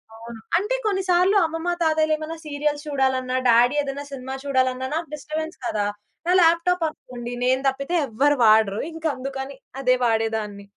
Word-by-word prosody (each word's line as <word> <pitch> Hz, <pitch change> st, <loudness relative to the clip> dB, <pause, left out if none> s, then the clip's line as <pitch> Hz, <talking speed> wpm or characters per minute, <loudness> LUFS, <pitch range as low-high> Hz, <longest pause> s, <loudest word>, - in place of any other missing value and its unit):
అవును. 230 Hz, 0 st, -10 dB, 0.2 s
అంటే 420 Hz, +7 st, 0 dB
కొన్నిసార్లు 380 Hz, -1 st, +2 dB
అమ్మమ్మ, 325 Hz, +2 st, -3 dB
తాతయ్యలేమైనా 315 Hz, 0 st, 0 dB
సీరియల్స్ 295 Hz, 0 st, -2 dB
చూడాలన్నా, 260 Hz, -3 st, 0 dB
డ్యాడి 240 Hz, +3 st, +5 dB
ఏద‌న్నా 280 Hz, 0 st, -5 dB
సినిమా 265 Hz, -1 st, -6 dB
చూడాలన్నా 260 Hz, -1 st, 0 dB
నాకు 330 Hz, 0 st, -3 dB
డిస్టర్‌బెన్స్ 310 Hz, +3 st, -5 dB
కదా! 210 Hz, -3 st, -1 dB, 0.4 s
నా 355 Hz, -, +4 dB
ల్యాప్‌టాపనుకోండి 330 Hz, -8 st, 0 dB
నేను 260 Hz, +1 st, +2 dB
దప్పితే 275 Hz, +6 st, -1 dB
ఎవ్వరు 275 Hz, +5 st, +2 dB
వాడరు. 215 Hz, -2 st, +4 dB
ఇంకందుకని 275 Hz, -4 st, -4 dB, 0.2 s
అదే 255 Hz, -1 st, +3 dB
వాడేదాన్ని. 220 Hz, -3 st, -1 dB
275 Hz, 130 wpm, -23 LUFS, 250-320 Hz, 0.4 s, డ్యాడి